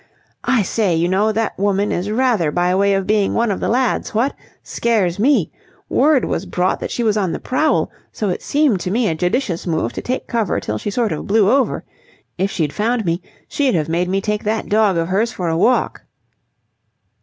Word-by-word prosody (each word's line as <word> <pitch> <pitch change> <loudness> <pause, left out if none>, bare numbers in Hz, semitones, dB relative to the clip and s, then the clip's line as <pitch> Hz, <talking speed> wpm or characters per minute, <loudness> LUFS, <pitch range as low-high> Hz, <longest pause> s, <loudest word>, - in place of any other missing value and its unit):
"I 245 -4 +3
say, 195 -2 0
you 165 +2 +1
know, 200 +4 +2
that 220 0 -1
woman 200 0 +1
is 185 +4 -2
rather 220 -8 +1
by 175 +3 +1
way 200 +1 +3
of 195 -1 -1
being 205 -1 +1
one 230 -2 +1
of 195 - -2
the - - -1
lads, 245 -2 0
what! 250 +6 +1 0.3
Scares 205 -6 0
me! 275 +6 +2 0.4
Word 295 -2 +3
was 185 - -3
brought 180 +1 0
that - - -4
she 240 - -2
was 215 -2 +2
on 190 -5 0
the - - -4
prowl, 305 +5 0 0.2
so 210 - -2
it 180 - -2
seemed 285 -9 +2
to 180 - -3
me 225 +3 +1
a 165 - +1
judicious 180 - -1
move 160 -8 -1
to - - -5
take 255 +1 -3
cover 225 -6 -1
till 105 0 -4
she - - -3
sort 225 +1 0
of 150 - -4
blew 205 -1 +3
over. 270 0 +1 0.5
If 195 +2 0
she'd 155 -6 -2
found 225 +1 0
me, 170 +1 -1 0.3
she'd 275 -7 0
have 155 -2 -1
made 175 +2 0
me 195 +1 0
take 210 0 -2
that 220 +1 -2
dog 210 -3 +3
of 165 0 0
hers 215 +6 +1
for 180 -7 -3
a 160 - 0
walk." 240 +9 +1
205 Hz, 215 wpm, -19 LUFS, 180-230 Hz, 0.5 s, I